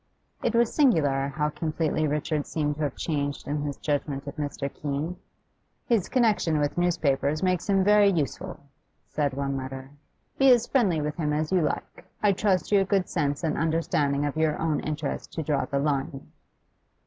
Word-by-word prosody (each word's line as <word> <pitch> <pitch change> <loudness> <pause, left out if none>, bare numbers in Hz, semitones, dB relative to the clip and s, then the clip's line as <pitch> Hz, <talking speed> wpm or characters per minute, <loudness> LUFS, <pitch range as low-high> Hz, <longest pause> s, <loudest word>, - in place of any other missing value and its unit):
It 235 - 0
was 235 -1 +3
singular 145 - +3
how 150 +2 -1
completely 155 0 -1
Richard 150 0 -1
seemed 150 -2 -1
to - - -5
have 145 -3 -1
changed 145 -3 -3
in 145 +1 -1
his 145 -1 -4
judgment 145 -2 -2
of 140 - -7
Mr. 145 -1 -3
Keene. 150 +4 -3 0.7
'His 225 -7 +1
connection 215 -10 +2
with 145 -1 0
newspapers 155 -4 +1
makes 185 +2 0
him 195 -1 +4
very 205 0 +5
useful,' 175 +1 -2 0.5
said 145 -3 -1
one 140 0 -2
letter. 130 0 -6 0.5
'Be 270 -1 +7
as 240 -1 +2
friendly 195 - +2
with 150 +2 -3
him 150 -3 0
as 155 +2 -1
you 185 -2 +3
like; 150 +2 -3 0.2
I 205 - +5
trust 195 -1 +1
to 205 - +4
your 195 - +4
good 195 -1 +1
sense 145 -2 -1
and 155 -2 0
understanding 150 -3 0
of 145 - -2
your 155 -1 +1
own 160 -2 0
interest 150 -1 -4
to 160 - -3
draw 145 -2 0
the 140 - -2
line. 140 -1 -2
155 Hz, 180 wpm, -26 LUFS, 145-180 Hz, 0.7 s, Be